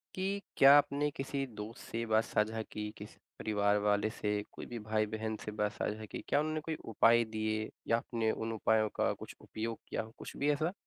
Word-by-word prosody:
कि 195 +2 -1 0.2
क्या 135 +1 +9
आपने 145 0 +2
किसी 135 0 -2
दोस्त 105 +2 -7
से 115 +1 -1
बात 110 0 +3
साझा 110 +1 0
की? 105 -1 -5
किसी 105 +1 -10 0.2
परिवार 105 -1 +2
वाले 105 +1 +2
से? 105 -1 -1
कोई - - -8
भी 120 - -6
भाई-बहन 110 0 -1
से 105 - -3
बात 105 0 0
साझा 110 +1 -3
की? - - -6
क्या - - +3
उन्होंने 155 +1 -1
कोई 160 +1 -3 0.2
उपाय 115 +2 +6
दिए 110 0 -2 0.2
या 115 - +4
आपने 115 -1 0
उन 115 +1 -3
उपायों 110 0 +2
का - - +3 0.3
उपयोग 115 +1 -4
किया - - -1
कुछ - - -8
भी 145 - +1
ऐसा? 155 +5 0
110 Hz, 195 wpm, -33 LUFS, 105-135 Hz, 0.3 s, क्या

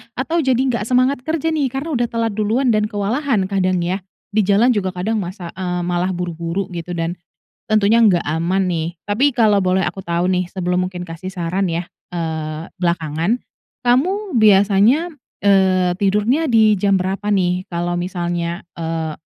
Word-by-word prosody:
atau, 320 +7 -1
jadi 260 -2 +2
nggak 250 -5 0
semangat 255 +2 +2
kerja 320 0 -1
nih, 285 -3 +1
karena 280 +4 -4
udah 240 0 +1
telat 230 -1 -1
duluan, 220 +5 +1
dan 215 -1 +2
kewalahan 210 0 0
kadang, 185 -2 +1
ya, 185 +3 -1 0.4
di 215 - +4
jalan 210 +6 +4
juga, 190 -2 -1
kadang 215 +5 -1
masa, 180 -2 -6
eee, 180 -1 -2
malah 175 +1 0
buru-buru 170 +2 -3
gitu, 170 +1 -5
dan, 165 +1 -2 0.5
tentunya 215 +2 +4
nggak 190 -6 +4
aman 170 +5 0
nih. 165 -3 -1 0.2
Tapi, 220 +8 +2
kalau 210 -4 +4
boleh 185 0 +1
aku 190 - -3
tahu 170 -1 -1
nih, 180 -1 0
sebelum 180 0 -1
mungkin 180 -1 -7
kasih 165 +2 -7
saran, 180 +1 -1
ya, 170 +1 -2 0.3
eee, 160 -2 -3 0.2
belakangan. 170 +4 0 0.5
Kamu, 365 +11 +1
biasanya, 210 - +4 0.3
eee, 190 -2 +4
tidurnya 210 +10 +2
di 220 -2 +5
jam 200 -1 +3
berapa 190 +2 -2
nih, 185 -2 +1
kalau 175 0 -2
misalnya, 175 -1 -3
eee, 160 -1 -3
190 Hz, 160 wpm, -19 LUFS, 175-225 Hz, 0.5 s, di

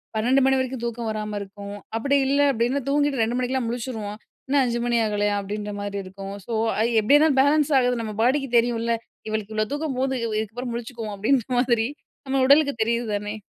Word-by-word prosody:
12:00 245 +5 +3
மணி 265 0 +4
வரைக்கும் 260 -2 -3
தூக்கம் 235 -1 -3
வராம 215 -1 -3
இருக்கும், 200 0 -8 0.2
அப்பிடி 275 +5 +1
இல்ல 280 +1 +2
அப்டினா 245 +3 0
தூங்கிட்டு, 285 -1 +1
2:00 230 +2 -1
மணிக்கெல்லாம் 255 -1 -1
முழிச்சுருவோம். 225 -4 -4 0.3
"இன்னும் 280 +1 +3
5:00 240 -1 -1
மணி 240 -1 +2
ஆகலயா!" 205 -1 0
அப்டின்றமாரி 205 0 -5
இருக்கும். 195 +1 -8
சோ, 235 - -5 0.3
ஐ - - +2 0.2
எப்பிடியன்னா 290 +8 +5
பேலன்ஸ் 295 +2 +3
ஆகுது. 245 -1 +1
நம்ம 215 -2 -5
பாடிக்கு 270 +2 +2
தெரியுன்ல! 235 0 +1 0.3
"இவளுக்கு 215 0 -3
இவ்ளோ 215 0 +1
தூக்கம் 295 -3 -3
போதும், 265 -2 0 0.2
இதுக்கப்பறம் 240 +3 -4
முழிச்சுக்குவோம்" 230 -2 -5
அப்டின்ற 230 +3 +2
மாதிரி, 235 -2 +2 0.4
நம்ம 265 0 +1
உடலுக்கு 285 0 +5
தெரியுது 235 +1 0
தானே! 205 +1 -4
235 Hz, 175 wpm, -24 LUFS, 215-265 Hz, 0.4 s, எப்பிடியன்னா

